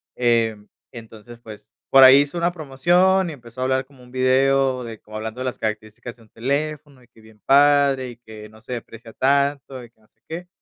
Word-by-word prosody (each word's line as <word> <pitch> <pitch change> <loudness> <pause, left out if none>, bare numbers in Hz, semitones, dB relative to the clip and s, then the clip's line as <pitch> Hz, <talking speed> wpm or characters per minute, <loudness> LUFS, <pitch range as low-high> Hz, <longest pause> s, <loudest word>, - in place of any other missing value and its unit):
em, 115 -3 0 0.3
entonces, 115 0 -13
pues, 110 -2 -14 0.2
por 135 0 +7
ahí 130 +1 +9
hizo 145 +4 -4
una 170 +1 0
promoción 175 +5 +1
y 160 - -7
empezó 120 -1 -12
a - - 0
hablar 130 0 0
como 130 -1 -21
un 125 - -18
video 130 0 +1
de 115 -2 -9
como 110 0 -14
hablando 110 +3 -6
de 130 - -4
las 130 - -4
características 110 +2 -6
de - - -22
un 110 - -24
teléfono 145 +2 -4
y - - -24
que 115 -2 -23
bien 110 -1 -20
padre 140 -2 +3
y 120 - -12
que 110 -3 -13
no 110 0 -18
se 125 - -8
deprecia 115 -1 -10
tanto 140 -1 -1
y 120 - -14
que 110 - -40
no 110 - -29
sé - - -39
qué. 170 +2 -7
130 Hz, 220 wpm, -21 LUFS, 115-140 Hz, 0.3 s, ahí